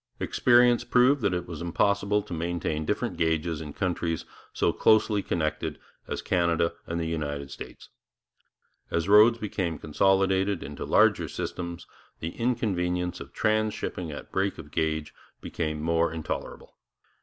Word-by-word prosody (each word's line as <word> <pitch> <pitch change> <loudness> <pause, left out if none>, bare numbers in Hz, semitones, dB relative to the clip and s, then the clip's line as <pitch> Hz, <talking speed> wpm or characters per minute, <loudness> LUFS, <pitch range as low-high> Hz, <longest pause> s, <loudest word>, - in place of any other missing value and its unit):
Experience 120 -1 +4
proved 125 +3 +4
that 100 - +2
it 90 -1 -2
was 85 -2 -7
impossible 100 +4 +1
to 100 - -8
maintain 80 -2 -2
different - - -2
gauges 80 -1 0
in 75 -2 -7
countries 85 -2 -2 0.3
so - - +1
closely 110 -1 +3
connected 75 -3 -2 0.3
as - - -4
Canada 85 -2 +1
and 85 0 -2
the 85 - -1
United 75 -3 -3
States. - - -10 1.0
As 85 +1 -1
roads 105 +3 +7
became 95 -7 -2
consolidated 95 +4 +2
into 70 +1 -6
larger - - +4
systems, 85 -1 -5 0.3
the 80 - -3
inconvenience 90 -7 -1
of - - -9
transhipping 110 -6 -1
at 75 - -9
break 95 +1 0
of 75 -3 -10
gauge 80 -1 -1 0.3
became 75 -1 -3
more 85 0 +2
intolerable. 80 -1 -6
85 Hz, 135 wpm, -27 LUFS, 80-100 Hz, 1.0 s, roads